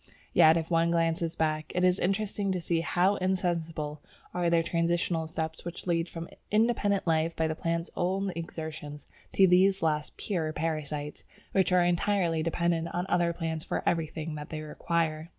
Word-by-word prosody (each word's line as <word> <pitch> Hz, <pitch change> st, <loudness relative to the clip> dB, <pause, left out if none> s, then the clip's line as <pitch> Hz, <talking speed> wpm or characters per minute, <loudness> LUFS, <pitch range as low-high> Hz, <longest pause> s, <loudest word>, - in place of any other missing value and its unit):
Yet 160 Hz, +1 st, +7 dB
if 165 Hz, +1 st, -3 dB
one 165 Hz, 0 st, +3 dB
glances 165 Hz, 0 st, 0 dB
back, 155 Hz, -1 st, -1 dB
it 180 Hz, -, +1 dB
is 180 Hz, 0 st, +4 dB
interesting 195 Hz, +1 st, 0 dB
to 180 Hz, -, -1 dB
see 165 Hz, -1 st, 0 dB
how 185 Hz, +4 st, +2 dB
insensible 165 Hz, -5 st, -1 dB, 0.3 s
are 175 Hz, -1 st, +1 dB
the 170 Hz, -1 st, +3 dB
transitional 170 Hz, -1 st, 0 dB
steps 160 Hz, 0 st, -4 dB
which 175 Hz, 0 st, -7 dB
lead 170 Hz, -1 st, 0 dB
from 165 Hz, 0 st, -6 dB, 0.2 s
independent 210 Hz, -2 st, +2 dB
life 165 Hz, 0 st, +1 dB
by 160 Hz, -, +1 dB
the 155 Hz, -, -1 dB
plant's 165 Hz, +1 st, -2 dB
own 190 Hz, +2 st, 0 dB
exertions 160 Hz, -3 st, -6 dB, 0.3 s
to 195 Hz, -, +6 dB
these 190 Hz, +1 st, +4 dB
last 150 Hz, -2 st, 0 dB
"pure 165 Hz, -6 st, -2 dB
parasites," 150 Hz, -2 st, -3 dB, 0.3 s
which 190 Hz, -1 st, +2 dB
are 180 Hz, -1 st, +5 dB
entirely 175 Hz, -2 st, +1 dB
dependent 165 Hz, 0 st, 0 dB
on 175 Hz, +1 st, -1 dB
other 175 Hz, -3 st, +2 dB
plants 165 Hz, -2 st, -3 dB
for -, -, -3 dB
everything 160 Hz, -1 st, -1 dB
that 150 Hz, 0 st, -7 dB
they 155 Hz, -2 st, -5 dB
require. 160 Hz, +1 st, -2 dB
165 Hz, 170 wpm, -29 LUFS, 160-180 Hz, 0.3 s, Yet